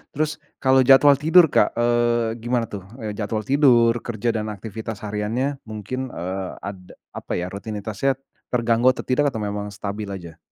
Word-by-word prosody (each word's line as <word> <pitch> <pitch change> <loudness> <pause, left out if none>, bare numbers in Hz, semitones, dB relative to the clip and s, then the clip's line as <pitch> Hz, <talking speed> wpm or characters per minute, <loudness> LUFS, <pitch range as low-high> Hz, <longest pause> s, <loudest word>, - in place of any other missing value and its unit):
terus 155 +1 -1 0.2
kalau 130 0 +5
jadwal 140 +1 +8
tidur 165 +4 +6
Kak, - - +3
eee, 120 -1 +1
gimana 120 -1 0
tuh? 100 -2 -5 0.2
Eee, 110 -3 -4
jadwal 110 0 -2
tidur, 130 -4 +5
kerja 120 0 -3
dan 110 -1 -2
aktivitas 110 +1 -6
hariannya 110 +7 -2
mungkin, 110 +4 -5 0.2
eee, 95 +2 -4
ada 95 -2 -8 0.2
apa - - -9
ya 90 - -2
rutinitasnya, 105 +5 -2 0.4
terganggu 120 0 +2
atau - - -6
tidak 135 +3 +2
atau 110 - -4
memang 105 0 -3
stabil 100 +1 -5
aja? 85 -5 -8
115 Hz, 160 wpm, -22 LUFS, 105-130 Hz, 0.4 s, jadwal